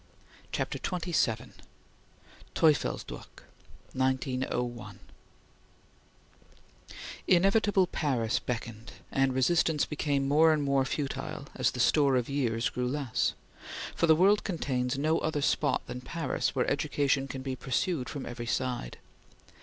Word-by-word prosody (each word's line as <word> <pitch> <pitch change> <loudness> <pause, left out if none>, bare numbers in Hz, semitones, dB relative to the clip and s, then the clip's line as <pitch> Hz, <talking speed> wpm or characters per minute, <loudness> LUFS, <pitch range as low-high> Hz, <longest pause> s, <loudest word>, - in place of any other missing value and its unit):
CHAPTER - - -2
XXVII 170 - -1 1.0
TEUFELSDROCKH 155 -4 0 0.5
(1901) 130 -2 -2 2.3
INEVITABLE 195 +1 +4
Paris 125 -9 0
beckoned, 115 -1 -5 0.2
and 135 -1 +2
resistance 150 +3 +2
became 145 -2 -1
more 155 +3 +5
and 150 -2 0
more 140 -1 +2
futile 140 +1 -4
as - - +1
the - - -7
store 140 -3 +4
of 125 -2 +1
years 120 -5 0
grew 125 0 -2
less; 135 -3 0 0.6
for 165 - +1
the 160 - +7
world 195 +5 +4
contains 130 -8 -1
no 155 +3 +2
other 150 -2 -1
spot 145 0 +1
than 125 - -6
Paris 165 +6 -2
where - - +1
education 140 -1 +1
can 130 -1 -6
be 130 -1 -3
pursued 130 +2 -1
from 145 - -5
every 120 -1 -6
side. 125 - -2
135 Hz, 115 wpm, -29 LUFS, 125-155 Hz, 2.3 s, the